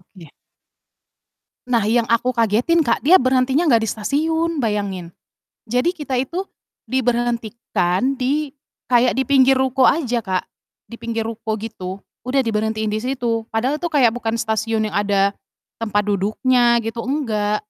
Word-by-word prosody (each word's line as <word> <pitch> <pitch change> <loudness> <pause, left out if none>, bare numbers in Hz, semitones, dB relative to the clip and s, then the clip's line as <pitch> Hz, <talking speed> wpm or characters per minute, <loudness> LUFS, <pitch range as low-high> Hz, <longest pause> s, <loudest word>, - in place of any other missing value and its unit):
Oke. 175 -4 -16 1.4
Nah, 235 -4 +1
yang 230 +1 +2
aku 245 +2 +2
kagetin 235 +9 +2
Kak, 235 - +1
dia 370 +3 +8
berhentinya 260 +5 +2
nggak 230 -3 +4
di - - -4
stasiun, 320 +8 -1
bayangin. 200 -7 -2 0.5
Jadi, 250 - +1
kita 280 -6 -3
itu 335 +9 -2 0.5
diberhentikan 235 -3 0
di 285 +3 0 0.4
kayak 245 0 +4
di 265 - +1
pinggir 270 0 +4
ruko 260 0 +2
aja 255 -6 +2
Kak, 190 -5 -2 0.5
di 235 - -8
pinggir 230 -1 -3
ruko, 225 -1 -4
gitu. 195 -4 -7 0.2
Udah 265 +1 +2
diberhentiin 220 -1 -1
di 215 - -1
situ, 235 -2 -2
padahal 255 +7 -1
itu 345 - -3
kayak 270 -7 +4
bukan 225 -1 -3
stasiun 220 -1 -1
yang - - -5
ada 200 -1 +2 0.5
tempat 210 -2 0
duduknya 235 +4 +2
gitu, 225 +1 -4
enggak. 215 -7 0
235 Hz, 140 wpm, -20 LUFS, 215-260 Hz, 1.4 s, dia